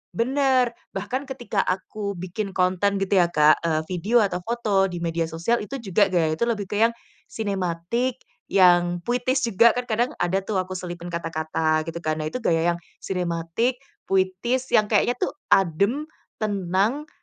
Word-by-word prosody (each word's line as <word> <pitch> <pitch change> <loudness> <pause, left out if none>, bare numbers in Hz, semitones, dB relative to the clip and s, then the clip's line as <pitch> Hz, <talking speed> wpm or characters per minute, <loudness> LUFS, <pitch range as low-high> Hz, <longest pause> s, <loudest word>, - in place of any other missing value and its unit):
benar, 255 0 +2 0.2
bahkan 245 +8 -3
ketika 240 -6 -1
aku 200 +2 -3
bikin 195 +3 -4
konten 190 +2 +1
gitu 195 0 0
ya 175 0 +1
Kak, 150 +2 +4
eee, 160 -2 +1
video 200 +7 +2
atau 190 -4 +1
foto 215 -4 +1
di 175 - -5
media 165 0 -1
sosial, 170 +8 0
itu 270 +5 -6
juga 195 -2 +2
gaya 160 -3 +2
itu 235 - -1
lebih 215 -5 -1
ke 210 +2 +1
yang 230 - +4 0.4
sinematik, 200 +5 -2 0.3
yang 175 -2 +4
puitis 250 +2 +1
juga, 230 +1 +5
kan 250 +1 -3
kadang 240 +4 0
ada 190 +2 0
tuh 195 -2 -1
aku 185 0 -4
selipin 175 -1 -6
kata-kata, 160 -1 -1
gitu 165 +1 -5
kan. 155 0 -1
Nah 155 - -2
itu 250 - -4
gaya 170 +1 +2
yang, 170 - -10 0.2
sinematik, 180 +7 -1 0.3
puitis, 195 +8 0
yang 215 -1 +4
kayaknya 235 +3 +3
tuh - - 0 0.2
adem, 200 - +2 0.4
tenang, 205 - 0
195 Hz, 165 wpm, -24 LUFS, 175-235 Hz, 0.4 s, juga